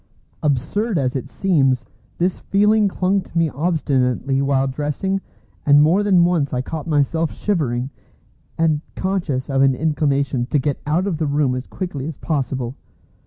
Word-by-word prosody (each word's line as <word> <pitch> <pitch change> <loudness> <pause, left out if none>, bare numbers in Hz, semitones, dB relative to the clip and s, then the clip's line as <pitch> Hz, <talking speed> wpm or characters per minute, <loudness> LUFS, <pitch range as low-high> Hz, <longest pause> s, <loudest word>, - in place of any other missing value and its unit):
Absurd 155 - 0
as 130 -3 0
it 135 0 -4
seems, 135 -11 +1 0.3
this 180 +1 0
feeling 210 +1 +3
clung 190 +1 +1
to 175 - -8
me 165 -1 +3
obstinately 135 -4 0
while 135 -1 +2
dressing, 150 +8 -2 0.4
and 145 0 +6
more 170 +7 +4
than 190 -4 +4
once 160 -7 +1
I 125 - -1
caught 160 +3 -5
myself 155 +1 +1
shivering, 135 - -1 0.7
and 155 -2 +2
conscious 175 -9 -1
of 135 -1 +1
an 135 -1 +4
inclination 140 -4 0
to 145 - +1
get 140 0 -1
out 165 +5 +1
of 190 -6 -1
the 155 -1 -1
room 140 -2 +1
as 125 0 -4
quickly 155 -7 -5
as 160 - -6
possible. 130 -4 -2
150 Hz, 160 wpm, -20 LUFS, 135-175 Hz, 0.7 s, and